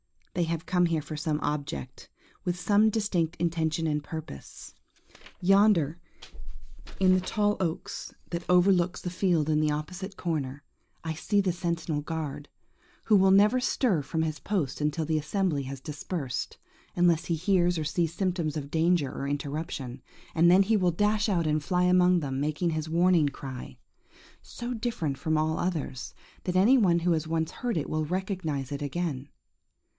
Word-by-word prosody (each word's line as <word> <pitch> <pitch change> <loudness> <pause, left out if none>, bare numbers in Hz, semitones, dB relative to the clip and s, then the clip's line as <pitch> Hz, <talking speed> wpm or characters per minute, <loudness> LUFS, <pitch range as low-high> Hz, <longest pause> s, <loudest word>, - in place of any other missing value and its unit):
They 175 - +1
have 165 +1 -3
come 180 -1 +2
here 165 -2 0
for 155 +1 -7
some 150 0 -1
object,–with 150 - -5
some 205 +4 +4
distinct 195 -7 0
intention 165 -1 -1
and 150 -2 0
purpose. 155 - -9 0.7
Yonder, 185 -5 +4 1.0
in 185 -1 +5
the 185 - +3
tall 205 +2 0
oak 170 -4 -2 0.4
that 170 0 -4
overlooks 180 0 +3
the 180 - -4
field 175 -4 +1
in 155 -1 +2
the 155 0 +2
opposite 185 +6 -4
corner, 145 -5 -3 0.4
I 160 -1 -2
see 205 +6 0
the 190 -2 +2
sentinel 170 -3 -2
guard, 150 -2 -5 0.6
who 215 - +4
will 190 0 +5
never 205 +6 +5
stir 240 - +1
from 160 +3 -2
his 155 -1 -3
post 175 -10 -2
until 150 +2 0
the 155 0 +1
assembly 155 -2 -1
has 135 0 -6
dispersed, 150 -2 -4 0.4
unless 175 -1 +3
he 170 - 0
hears 175 0 +2
or 160 - -1
sees 165 +2 -1
symptoms 175 -5 -1
of 140 -1 -6
danger 165 -3 +2
or 140 - -4
interruption, 140 -3 -4 0.3
and 170 +1 +5
then 185 +3 +6
he 215 +2 +2
will 180 -3 +2
dash 210 +4 +1
out 170 -4 +1
and 155 0 +1
fly 180 +4 +1
among 180 -1 +4
them, 135 -2 -3
making 155 +4 0
his 155 0 -3
warning 170 -2 +3
cry, 130 - -8 0.6
so 240 +1 -6
different 215 - -2
from 160 -2 0
all 155 +1 0
others, 155 -7 -3 0.3
that 180 - -1
any 215 +9 +6
one 180 -7 +4
who 175 +1 +1
has 160 -1 0
once 160 0 -1
heard 240 -7 -2
it 150 - -2
will 155 0 -1
recognize 175 -6 -3
it 140 0 -4
again. 145 -2 -3
165 Hz, 165 wpm, -28 LUFS, 150-185 Hz, 1.0 s, then